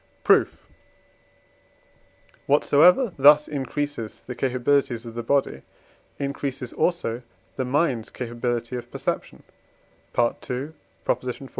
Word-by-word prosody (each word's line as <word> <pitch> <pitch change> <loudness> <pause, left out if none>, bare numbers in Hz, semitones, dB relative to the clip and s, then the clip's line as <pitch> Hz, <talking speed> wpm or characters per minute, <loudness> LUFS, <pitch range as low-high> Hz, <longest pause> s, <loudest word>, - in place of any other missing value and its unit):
Proof. - - +4 1.9
Whatsoever 175 - +5
thus 150 +2 +7
increases 145 -4 -4
the 125 - -6
capabilities 125 -1 0
of 115 - -8
the 120 - -4
body 120 - 0 0.6
increases 140 -2 -4
also 155 -9 0 0.3
the 130 - -2
mind's 130 -4 0
capability 120 0 -3
of 120 - -6
perception - - -4 0.7
(II. 125 +4 -1 0.3
xiv.) 125 +2 -2
130 Hz, 95 wpm, -24 LUFS, 120-145 Hz, 1.9 s, thus